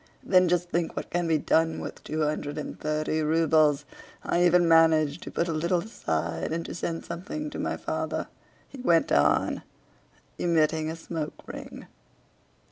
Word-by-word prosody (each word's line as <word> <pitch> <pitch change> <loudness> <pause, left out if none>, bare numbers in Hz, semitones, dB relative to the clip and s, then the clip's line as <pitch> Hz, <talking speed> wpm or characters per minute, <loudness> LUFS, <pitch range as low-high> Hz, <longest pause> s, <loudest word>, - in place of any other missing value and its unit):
Then 185 -1 +4
just 175 0 0
think 170 -1 -1
what - - -5
can 175 -1 0
be 160 -1 +3
done 160 +2 +1
with - - -7
two 155 0 -2
hundred 150 0 -2
and 150 - -6
thirty 155 +1 -1
rubles! 155 -2 +3 0.4
I 175 - +1
even 175 0 +5
manage 160 -2 +4
to - - -8
put 170 - -1
a 165 - -1
little 170 +3 +1
aside 85 - -3
and 165 +1 -2
to - - -6
send 165 -1 -4
something 205 - -5
to - - -6
my - - -2
father," - - -3 0.4
he 270 - -10
went 170 -9 +3
on, 75 +2 +3 0.8
emitting 160 -2 +2
a 160 - -4
smoke 160 -2 -6
ring. - - -8
165 Hz, 165 wpm, -27 LUFS, 155-170 Hz, 0.8 s, even